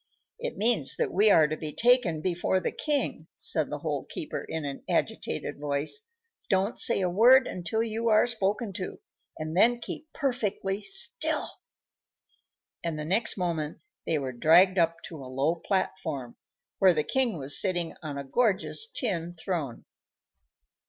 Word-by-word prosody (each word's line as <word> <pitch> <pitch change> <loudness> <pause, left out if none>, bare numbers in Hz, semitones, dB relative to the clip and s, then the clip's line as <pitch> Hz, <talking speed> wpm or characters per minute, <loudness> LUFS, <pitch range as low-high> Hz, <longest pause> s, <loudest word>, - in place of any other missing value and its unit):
"It - - -4
means 220 - +2
that - - -1
we 210 +3 +5
are 160 -6 +6
to 155 - -2
be 155 -1 -5
taken 235 -10 +3
before 185 +1 +1
the - - -2
king," 295 -2 -1
said - - 0
the - - -3
Hole - - -3
keeper, 320 -5 -4
in 160 -2 -4
an 140 -1 -6
agitated - - -2
voice. 150 - -2 0.4
"Don't 195 +2 +1
say 215 - +4
a 185 - +2
word 245 +8 +6
until 185 +6 -2
you 230 +1 -1
are 215 +1 +5
spoken 215 -2 -1
to, 185 - -6 0.4
and 155 +1 -5
then 235 +6 +5
keep 315 +6 -6
perfectly 210 -7 -2
still;" 390 - -2 1.4
and 165 -2 -2
the 150 - -4
next 195 +8 +1
moment 165 -4 -2 0.3
they 160 - +1
were 135 -3 -3
dragged 180 +9 +5
up 165 0 +1
to 165 - -8
a 130 - -9
low 135 +5 +1
platform, 165 - -3 0.4
where 185 -3 +5
the 150 - +1
king 255 - +1
was 140 0 +1
sitting 175 -4 -1
on 150 -3 -5
a 140 - -4
gorgeous 210 - +1
tin 175 - -3
throne. 160 -7 -4
185 Hz, 160 wpm, -28 LUFS, 155-225 Hz, 1.4 s, are